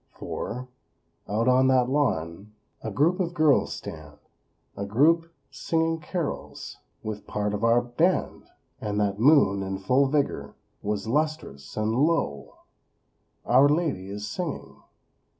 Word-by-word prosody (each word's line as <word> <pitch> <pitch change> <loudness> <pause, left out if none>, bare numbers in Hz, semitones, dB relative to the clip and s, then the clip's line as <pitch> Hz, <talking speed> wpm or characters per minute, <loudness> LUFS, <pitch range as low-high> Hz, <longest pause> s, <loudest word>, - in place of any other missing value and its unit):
For, 125 +2 -5 0.6
out 110 +4 0
on 130 +1 +5
that 130 -2 +4
lawn 105 - -1 0.3
A 110 - -4
group 155 - +2
of 175 -2 -2
girls 155 -4 +3
stand; 75 -2 -9 0.6
A 100 - -4
group 160 +11 +3 0.2
singing 165 +4 -1
carols 165 0 -5 0.3
With 105 -1 -6
part 105 0 -2
of 105 +1 -3
our 115 +1 +4
Band. 160 +10 0 0.3
And 105 -1 -2
that 100 -1 0
moon, 120 -7 +5
in 95 0 -3
full 125 +9 +2
vigor, 145 0 -1 0.3
Was 105 -1 -2
lustrous; 145 - -2
and 110 +1 0
lo! 140 - 0 0.9
_Our 135 +4 +5
Lady 150 - 0
is 105 +1 -5
singing! 160 +9 -5
125 Hz, 130 wpm, -26 LUFS, 105-150 Hz, 0.9 s, on